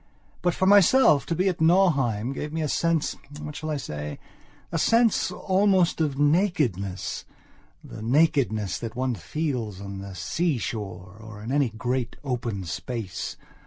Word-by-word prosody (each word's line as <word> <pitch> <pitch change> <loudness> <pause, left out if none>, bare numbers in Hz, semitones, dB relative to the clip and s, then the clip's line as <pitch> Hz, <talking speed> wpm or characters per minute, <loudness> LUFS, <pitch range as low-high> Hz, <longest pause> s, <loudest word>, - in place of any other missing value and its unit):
But, 175 -1 +1
for 190 - +1
myself, 200 - +6
to 165 - 0
be 185 +4 +1
at 180 -4 -1
Nauheim 140 - +3
gave 150 +2 -5
me 160 0 -2
a - - 0
sensewhat 150 -2 -2
shall 155 - -5
I 150 - -1
say?a 75 - -7
sense 230 +4 +3
almost 190 -3 +2
of 145 -3 0
nakednessthe 145 - 0 0.6
nakedness 115 - +1
that 115 -1 -6
one 130 0 0
feels 115 - -3
on 100 -1 -7
the 100 -1 -8
sea 165 - 0
shore 95 -4 -5
or 110 -1 -10
in 115 - -4
any 140 -3 +2
great 120 +2 -2
open 120 -7 -3
space. 95 +3 -5
135 Hz, 140 wpm, -25 LUFS, 110-165 Hz, 0.6 s, myself